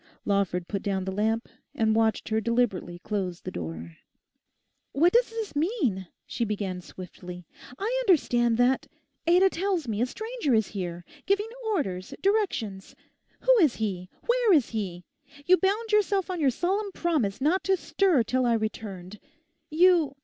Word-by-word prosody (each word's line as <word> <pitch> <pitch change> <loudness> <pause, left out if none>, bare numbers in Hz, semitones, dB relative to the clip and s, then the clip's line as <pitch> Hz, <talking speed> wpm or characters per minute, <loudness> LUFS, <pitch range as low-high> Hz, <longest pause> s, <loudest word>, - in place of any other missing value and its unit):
Lawford 195 -3 0
put 200 -2 -3
down 190 -2 -2
the 190 - -2
lamp, 220 +4 0 0.3
and 220 -1 +2
watched 220 -1 +1
her 220 0 +1
deliberately 225 -6 0
close 185 -2 -3
the - - -6
door. 80 -1 -7 1.0
'What 330 +6 +4
does 480 +1 +4
this 450 -6 -5
mean?' 290 - 0 0.2
she - - -3
began 200 -4 -3
swiftly, 180 0 -10 0.3
'I 460 +5 -1
understand 240 - +3
that—Ada 335 +8 +1
tells 360 -4 -1
me 215 -1 -2
a 245 - +2
stranger 440 - -1
is 220 -2 +1
here; 175 -3 -5 0.2
giving 405 +3 +1 0.2
orders, 195 - -2
directions. 305 - -1 0.5
Who - - +5
is 305 - +4
he? 185 -4 -3 0.2
where 480 -2 +3
is 295 -10 +4
he? 190 -6 -4 0.4
You 370 +3 +6
bound 420 +4 0
yourself 400 -3 +2
on 360 - -3
your 285 -4 +3
solemn 390 - -1
promise 285 - 0
not 320 +8 +1
to 385 0 +3
stir 360 -7 +2
till 255 +2 0
I 235 - +3
returned. 210 -3 -5 0.5
You... 330 -3 +4
240 Hz, 150 wpm, -27 LUFS, -, 1.0 s, You